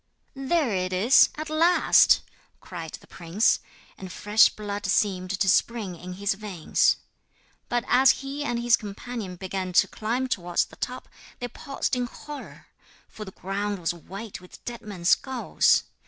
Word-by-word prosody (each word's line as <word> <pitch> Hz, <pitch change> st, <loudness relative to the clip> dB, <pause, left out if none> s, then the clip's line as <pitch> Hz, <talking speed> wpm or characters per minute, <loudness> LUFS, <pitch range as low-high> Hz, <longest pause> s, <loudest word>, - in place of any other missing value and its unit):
'There 270 Hz, -2 st, 0 dB
it 185 Hz, -1 st, -1 dB
is, 205 Hz, +8 st, +5 dB
at 310 Hz, +1 st, -5 dB
last,' 330 Hz, +3 st, +5 dB, 0.4 s
cried 165 Hz, -3 st, -8 dB
the -, -, -10 dB
prince; 175 Hz, +5 st, +1 dB, 0.4 s
and 185 Hz, -1 st, -8 dB
fresh 210 Hz, +4 st, +4 dB
blood 205 Hz, -1 st, -6 dB
seemed 190 Hz, -1 st, 0 dB
to 195 Hz, +1 st, 0 dB
spring 205 Hz, -1 st, +1 dB
in 180 Hz, +2 st, -8 dB
his 200 Hz, +2 st, -1 dB
veins. 195 Hz, -5 st, +1 dB, 0.7 s
But 240 Hz, 0 st, 0 dB
as 260 Hz, +1 st, +5 dB, 0.2 s
he 280 Hz, +2 st, -4 dB
and 240 Hz, -4 st, -1 dB
his 240 Hz, 0 st, +4 dB
companion 210 Hz, -1 st, -7 dB
began 185 Hz, 0 st, -4 dB
to -, -, +5 dB
climb 235 Hz, +4 st, -2 dB
towards 175 Hz, -7 st, 0 dB
the -, -, -16 dB
top -, -, -5 dB, 0.3 s
they 245 Hz, -, -4 dB
paused 275 Hz, +2 st, -3 dB
in 245 Hz, -1 st, -1 dB
horror, 295 Hz, +4 st, -10 dB, 0.4 s
for 215 Hz, -, -9 dB
the 190 Hz, -, -9 dB
ground 200 Hz, +2 st, -3 dB
was 175 Hz, -1 st, -1 dB
white 195 Hz, +5 st, -9 dB
with 180 Hz, -, -15 dB
dead 240 Hz, -1 st, -6 dB
men's 185 Hz, -5 st, -3 dB
skulls. 265 Hz, -3 st, +3 dB
205 Hz, 155 wpm, -26 LUFS, 185-245 Hz, 0.7 s, is